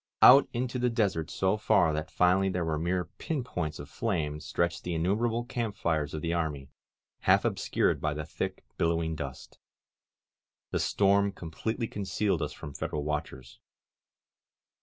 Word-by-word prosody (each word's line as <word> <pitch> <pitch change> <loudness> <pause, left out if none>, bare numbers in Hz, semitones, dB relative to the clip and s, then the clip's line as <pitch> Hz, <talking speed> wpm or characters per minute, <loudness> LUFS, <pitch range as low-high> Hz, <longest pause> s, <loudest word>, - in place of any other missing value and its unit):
Out 135 +2 +9
into 125 +1 -2
the 125 0 +2
desert 95 -9 0
so 95 +2 +1
far 95 -7 +3
that 75 0 -3
finally 95 +2 +3
they 90 -1 -1
were 80 -2 -1
mere 90 +2 0
pin 150 -6 -2
points 80 -10 -3
of 70 - -8
flame 80 -6 -2
stretched 85 +2 -1
the 90 -1 -2
innumerable 110 +8 +1
camp 115 -4 -3
fires 80 -8 -1
of 75 - -5
the 85 0 0
army, 75 -5 -2 0.5
half - - +4
obscured - - +1
by 75 -1 0
the 75 0 -4
thick, 75 - -4
billowing 85 -1 +1
dust. 70 -4 -7 1.1
The - - 0
storm 100 0 +3
completely 105 +7 -4
concealed 100 -2 -1
us - - -2
from 75 - -9
Federal 75 +1 -3
watchers. 75 -4 -4
90 Hz, 155 wpm, -29 LUFS, 75-105 Hz, 1.1 s, Out